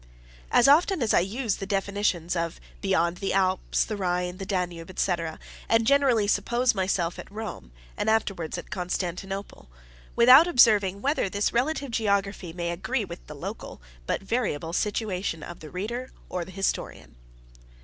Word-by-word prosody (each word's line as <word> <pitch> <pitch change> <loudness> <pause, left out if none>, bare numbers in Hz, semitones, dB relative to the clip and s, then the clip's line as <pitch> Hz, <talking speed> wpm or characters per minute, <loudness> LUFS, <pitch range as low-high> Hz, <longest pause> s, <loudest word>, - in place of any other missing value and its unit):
As 245 - +5
often 320 +2 +4
as 220 - +1
I - - +6
use 210 +4 -1
the 195 - -6
definitions 195 -3 0
of 170 -1 -2 0.2
beyond 180 -3 +1
the 195 - -2
Alps, 185 -1 +1
the 215 - -4
Rhine, 180 -2 -1
the 195 - -6
Danube, 180 -2 -3
&c., - - +1 0.6
I 225 - +6
generally 245 -2 +3
suppose 235 +5 +2
myself 185 -3 -1
at - - -10
Rome, 205 - -7 0.2
and - - -1
afterwards 195 -7 0
at - - -9
Constantinople; 185 - -4 0.5
without 255 +7 +8
observing 205 - +4
whether 280 -7 +1
this 205 +2 0
relative 275 +2 0
geography 200 -5 0
may 170 0 -3
agree 170 - -2
with - - -10
the - - -9
local, - - -7 0.3
but - - -1
variable, 195 -8 -2
situation 195 -6 -2
of 175 - -8
the 155 - -10
reader, 235 - -4 0.2
or 180 -2 -3
the - - -13
historian. 185 - -3
195 Hz, 155 wpm, -26 LUFS, 180-225 Hz, 0.6 s, without